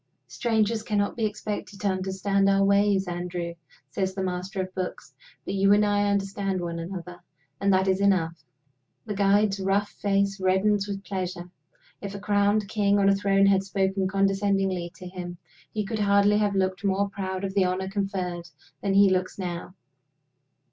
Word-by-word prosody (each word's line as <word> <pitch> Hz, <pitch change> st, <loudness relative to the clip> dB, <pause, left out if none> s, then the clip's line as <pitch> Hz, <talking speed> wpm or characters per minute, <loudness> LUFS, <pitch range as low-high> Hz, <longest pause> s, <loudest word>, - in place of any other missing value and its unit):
"Strangers 225 Hz, -2 st, 0 dB
cannot 205 Hz, -2 st, -1 dB
be 225 Hz, -, 0 dB
expected 210 Hz, -1 st, -6 dB
to 205 Hz, -, -1 dB
understand 195 Hz, +1 st, +1 dB
our 195 Hz, 0 st, +3 dB
ways, 200 Hz, -1 st, +3 dB
Andrew," 175 Hz, -1 st, -4 dB, 0.4 s
says 190 Hz, +4 st, -2 dB
The 190 Hz, -, -2 dB
Master 185 Hz, +2 st, -3 dB
of 185 Hz, 0 st, -3 dB
Books. 185 Hz, -1 st, -5 dB, 0.3 s
"But -, -, -3 dB
you 195 Hz, +1 st, +4 dB
and 210 Hz, +1 st, +4 dB
I 205 Hz, 0 st, +2 dB
understand 195 Hz, -1 st, -1 dB
one 170 Hz, -1 st, -4 dB
another 175 Hz, 0 st, -7 dB, 0.4 s
and 200 Hz, 0 st, +2 dB
that 190 Hz, 0 st, +3 dB
is 190 Hz, +1 st, +2 dB
enough." 170 Hz, -6 st, +1 dB, 0.6 s
The 215 Hz, -, -3 dB
guide's 200 Hz, 0 st, +2 dB
rough 195 Hz, +2 st, +1 dB
face 200 Hz, -1 st, 0 dB
reddens 195 Hz, +2 st, +2 dB
with 200 Hz, -1 st, -5 dB
pleasure. 185 Hz, -3 st, -5 dB, 0.5 s
If 200 Hz, 0 st, -6 dB
a -, -, -5 dB
crowned 205 Hz, 0 st, +2 dB
king 205 Hz, -1 st, +2 dB
on 200 Hz, -1 st, +4 dB
a 195 Hz, -, +4 dB
throne 195 Hz, 0 st, +3 dB
had 195 Hz, -1 st, +4 dB
spoken 195 Hz, 0 st, 0 dB
condescendingly 195 Hz, -2 st, 0 dB
to 180 Hz, +2 st, -9 dB
him, 180 Hz, -1 st, -7 dB, 0.3 s
he 210 Hz, -1 st, -2 dB
could 220 Hz, +1 st, -3 dB
hardly 200 Hz, 0 st, +4 dB
have 205 Hz, -1 st, +1 dB
looked 190 Hz, 0 st, 0 dB
more 200 Hz, 0 st, +1 dB
proud 190 Hz, -1 st, -4 dB
of 195 Hz, -1 st, -3 dB
the 195 Hz, -2 st, +3 dB
honor 185 Hz, +1 st, -1 dB
conferred 190 Hz, -3 st, -3 dB, 0.3 s
than 195 Hz, -1 st, 0 dB
he 200 Hz, 0 st, +7 dB
looks 185 Hz, 0 st, -1 dB
now. 180 Hz, -1 st, -5 dB
195 Hz, 170 wpm, -26 LUFS, 185-200 Hz, 0.6 s, he